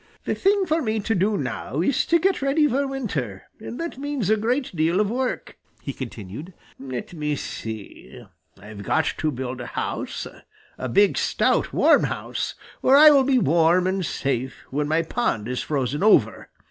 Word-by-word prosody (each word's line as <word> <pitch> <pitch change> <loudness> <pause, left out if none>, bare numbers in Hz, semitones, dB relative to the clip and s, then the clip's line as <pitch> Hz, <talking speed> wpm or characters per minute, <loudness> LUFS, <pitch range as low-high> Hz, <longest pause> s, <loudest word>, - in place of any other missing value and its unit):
"The - - 0
thing 395 0 +2
for 320 -1 +1
me 220 -3 -1
to 220 +2 -1
do 200 +2 +1
now 135 +1 -4
is 240 +9 +1
to 335 - +4
get 380 +1 +1
ready 285 +3 +3
for 275 +1 0
winter, 160 - -4 0.2
and 225 +2 -8
that 335 -5 -5
means 280 -8 -2
a - - +5
great 240 +1 -1
deal 165 +4 +2
of 210 0 +1
work," 255 +1 -3 0.2
he 140 - -4
continued. 120 - -8 0.3
"Let 130 +3 -6
me 150 -2 -2
see, 110 -5 -8 0.3
I've 100 +1 -10
got 160 +9 +1
to 155 - +1
build 130 -1 -5
a 120 - -6
house, - - -3 0.5
a 130 - -3
big, 200 +11 +3
stout, - - +1
warm - - +4
house, - - -4 0.3
where 270 +2 +6
I 305 +1 +9
will 280 -2 +5
be 265 0 +2
warm 170 - +3
and 190 0 0
safe 130 -4 -3
when 145 +2 -1
my 160 +2 +1
pond 140 - -1
is 125 0 -2
frozen 140 0 -2
over. 215 +1 +3
180 Hz, 180 wpm, -23 LUFS, -, 0.5 s, I